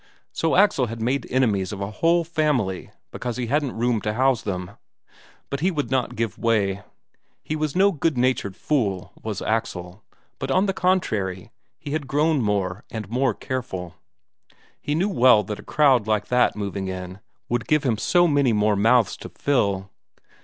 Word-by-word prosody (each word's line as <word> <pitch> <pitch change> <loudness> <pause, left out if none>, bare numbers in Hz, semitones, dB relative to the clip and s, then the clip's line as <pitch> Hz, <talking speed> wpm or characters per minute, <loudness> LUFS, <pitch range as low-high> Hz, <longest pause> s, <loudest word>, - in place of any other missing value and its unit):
So 165 - 0
Axel 185 -10 +4
had 115 +1 -6
made 125 +3 -1
enemies 110 -7 +1
of 100 - -6
a 100 +1 -4
whole 170 +8 +2
family 150 - -1 0.2
because 120 -1 -4
he 125 - -2
hadn't 140 0 -1
room 120 -1 +1
to 105 - -2
house 130 -1 +2
them. 90 -2 -4 0.8
But 140 - -2
he 180 +5 +2
would 145 -8 -3
not 130 -2 0
give 115 -3 -3
way. 100 -4 +1 0.6
He 155 - -3
was 155 -2 -2
no 195 +2 +5
good 160 -4 -1
natured 120 -6 0
fool, 100 -11 -1
was 110 -3 -4
Axel, 100 -4 -3 0.4
but - - -4
on 185 +2 +3
the 195 - 0
contrary 110 - -1 0.3
he 145 - -8
had 150 -2 -2
grown 150 +1 +2
more 100 -2 -1
and 110 -4 -6
more 125 -2 +1
careful; 95 -9 -5 0.9
he 145 - -1
knew 180 +5 +1
well 125 - +5
that 105 +1 -6
a - - -10
crowd 130 -8 +3
like 110 -1 0
that 125 0 +3
moving 100 -2 -4
in 95 0 -6 0.3
would 120 - -2
give 150 -2 +2
him 115 -6 0
so 175 +6 +3
many 140 -6 +2
more 105 0 +2
mouths 115 +2 +3
to - - -9
fill. 100 -8 0
120 Hz, 175 wpm, -23 LUFS, 100-145 Hz, 0.9 s, no